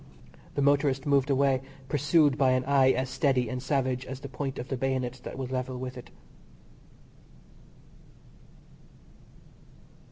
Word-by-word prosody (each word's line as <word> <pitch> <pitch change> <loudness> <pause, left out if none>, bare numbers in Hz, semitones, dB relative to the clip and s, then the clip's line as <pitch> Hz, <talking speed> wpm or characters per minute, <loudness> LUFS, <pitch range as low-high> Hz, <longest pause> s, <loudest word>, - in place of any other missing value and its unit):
The 140 - +1
motorist 140 -1 +2
moved 140 -1 +2
away, 135 -1 +2 0.3
pursued 145 0 +3
by 135 -2 +3
an 130 0 0
eye 135 -1 +4
as 130 +1 +1
steady 130 -2 +1
and 125 +1 -4
savage 130 -1 -1
as 130 0 -7
the 140 - -6
point 135 0 -5
of 125 - -6
the 135 - -1
bayonet 130 -1 -2
that - - -7
was 130 -1 -5
level 130 0 -3
with 130 0 -6
it. 125 - -10
130 Hz, 135 wpm, -28 LUFS, 130-140 Hz, 0.3 s, eye